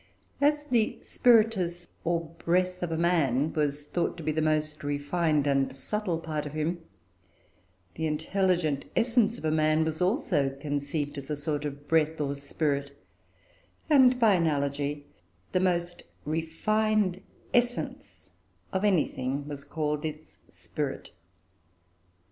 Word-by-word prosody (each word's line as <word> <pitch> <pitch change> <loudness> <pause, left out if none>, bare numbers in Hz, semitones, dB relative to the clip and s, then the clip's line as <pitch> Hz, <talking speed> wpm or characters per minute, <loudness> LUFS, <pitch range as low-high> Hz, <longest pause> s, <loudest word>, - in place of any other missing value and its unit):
As 295 +1 +3
the 240 -7 +1
"spiritus," 205 -8 +3 0.2
or 170 -1 -1
breath, 180 +1 +1
of 175 -2 -2
a 160 - -1
man 160 -4 +2
was 145 -1 -1
thought 175 +3 -1
to 165 - -7
be 155 - 0
the 155 +1 0
most 155 -1 0
refined 145 +1 0
and 135 -2 +1
subtle 185 +5 -2
part 155 -2 -4
of 145 - -8
him, 160 +3 -1 1.1
the 160 - -2
intelligent 160 -1 0
essence 235 -1 +2
of 155 -5 -1
man 155 0 +3
was 160 +1 -3
also 180 - +2
conceived 145 0 -2
as 135 - -10
a 150 - 0
sort 150 0 -3
of 145 0 -6
breath, 160 -1 +2
or 140 -1 -1
spirit; 140 0 -2 0.9
and, 255 -3 +6
by 225 -4 +5
analogy, 145 -3 0 0.5
the 185 - +2
most 175 -1 0 0.2
refined 185 +5 0 0.3
essence 245 0 -1 0.4
of 190 +1 0
anything 145 -8 0
was 145 -1 -6
called 150 -1 -2
its 155 0 -7
"spirit." - - -5
160 Hz, 130 wpm, -28 LUFS, 145-185 Hz, 1.1 s, and